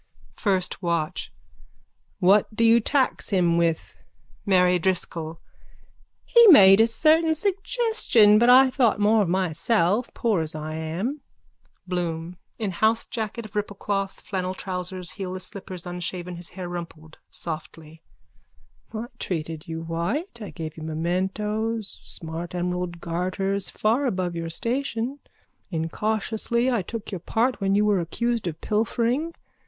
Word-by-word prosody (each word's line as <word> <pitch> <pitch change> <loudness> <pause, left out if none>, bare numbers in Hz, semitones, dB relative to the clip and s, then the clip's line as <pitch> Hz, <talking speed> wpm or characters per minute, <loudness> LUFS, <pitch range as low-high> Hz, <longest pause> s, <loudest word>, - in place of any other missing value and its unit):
FIRST 190 -4 -1
WATCH: 170 -1 -2 0.9
What 200 +3 +3
do 230 - +1
you 230 +1 +6
tax 265 +3 0
him 175 -4 +2
with? 170 -1 0 0.5
MARY 180 -2 +4
DRISCOLL: 165 -2 -1 0.9
He 470 -1 +7
made 195 - +9
a 225 - +5
certain 315 +7 +3
suggestion 390 - +3
but 240 +1 +4
I 260 +1 +7
thought 240 -6 +2
more 215 +1 +4
of 190 - 0
myself 185 +5 +1
as - - -32
poor 215 -7 +1
as 155 -1 -3
I 155 0 -5
am. 175 - -3 0.7
BLOOM: 175 -1 -3 0.2
(In 215 -4 -2
housejacket 220 +2 -1
of 215 - -11
ripplecloth, 200 -1 -3
flannel 185 -1 -3
trousers, 180 -1 -3
heelless 185 -2 -4
slippers, 185 -3 -6
unshaven, 175 0 -4
his 170 0 -4
hair 180 -1 -7
rumpled: 165 -3 -8
softly.) 160 -1 -6 0.9
I 225 +1 -4
treated 160 -3 -4
you 165 0 -5
white. 175 - -3
I 210 - -6
gave 160 -2 -7
you - - -8
mementos, 195 +7 -2
smart 165 +2 -7
emerald 180 -1 -3
garters 185 +3 -2
far 240 +6 +1
above 185 -6 -2
your 165 0 -4
station. 245 - -2 0.5
Incautiously 215 +8 -1
I 235 -4 +1
took 220 +4 -7
your 190 - -4
part 235 +7 0
when 195 0 +2
you 210 +1 +3
were 205 -2 +3
accused 230 +5 -2
of 160 -1 -4
pilfering. 235 +8 0
190 Hz, 135 wpm, -25 LUFS, 170-225 Hz, 0.9 s, made